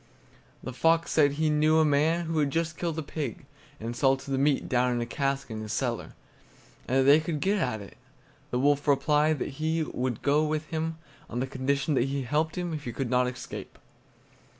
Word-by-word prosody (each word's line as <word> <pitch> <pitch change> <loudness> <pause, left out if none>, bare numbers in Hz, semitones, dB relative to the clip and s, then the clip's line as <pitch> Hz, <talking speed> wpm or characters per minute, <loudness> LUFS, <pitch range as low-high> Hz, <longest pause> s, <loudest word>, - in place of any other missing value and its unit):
The 130 - -5
fox 165 +7 +2
said 145 -3 +4
he 155 +1 +1
knew 155 +1 +3
a 160 - +5
man 155 +4 +2
who 160 -1 -1
had 145 -2 +2
just 165 +2 -1
killed 165 -2 -3
a 160 - -2
pig, 155 +2 -5 0.3
and 115 +2 -5
salted 135 +1 +1
the 135 - +1
meat 140 0 +2
down 125 0 +2
in 120 - -1
a 120 - -1
cask 135 +1 -2
in 110 0 -4
his 110 -1 -5
cellar, - - -2 0.7
and 130 - +1
that - - +3
they 140 +3 +7
could 155 -1 -3
get 200 +6 +1
at 125 - -1
it. 100 - -12 0.5
The 125 - -1
wolf 145 +2 +2
replied 150 +2 +3
that - - -3
he 160 +1 +1
would 125 -5 -3
go 145 +2 +3
with 155 0 -1
him 160 0 -2 0.3
on 120 - -3
condition 140 +3 -1
that 130 -2 +2
he 135 0 -2
helped 155 +6 -1
him 175 -2 -2
if 150 -2 -5
he 120 - -4
could 130 -3 -3
not 125 0 +3
escape. 125 0 -7
145 Hz, 210 wpm, -28 LUFS, 130-155 Hz, 0.7 s, they